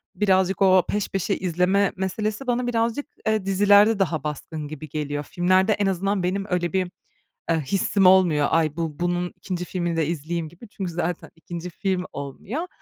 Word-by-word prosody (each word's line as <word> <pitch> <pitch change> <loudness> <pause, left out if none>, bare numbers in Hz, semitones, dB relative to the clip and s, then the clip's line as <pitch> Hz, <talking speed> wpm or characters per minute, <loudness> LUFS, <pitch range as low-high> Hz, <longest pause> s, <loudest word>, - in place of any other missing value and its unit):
birazcık 190 -1 +2
o 185 -1 +6
peş 205 -1 -1
peşe 195 +1 -1
izleme 185 +2 +1
meselesi 210 +6 -2
bana 245 0 0
birazcık, 235 +3 0 0.2
eee, 220 -3 +1
dizilerde 205 +2 +5
daha 160 -6 0
baskın 150 0 -5
gibi 155 0 -8
geliyor. 145 0 -3
Filmlerde 185 +4 +2
en 205 - 0
azından 195 +1 0
benim 195 +2 -1
öyle 175 -1 -1
bir, 185 -2 0 0.6
eee, 165 - +4
hissim 195 +6 +1
olmuyor. 180 -6 +5
Ay, 160 -2 +2
bu 160 -3 -3
bunun 175 0 -1
2. 180 -2 -4
filmini 175 -2 -2
de 160 -3 +1
izleyeyim 165 0 -3
gibi 175 +8 -14
çünkü 190 -3 -5
zaten 175 0 -3
2. 170 +1 -7
film 185 +1 -2
olmuyor. 185 - -5
180 Hz, 170 wpm, -24 LUFS, 165-200 Hz, 0.6 s, o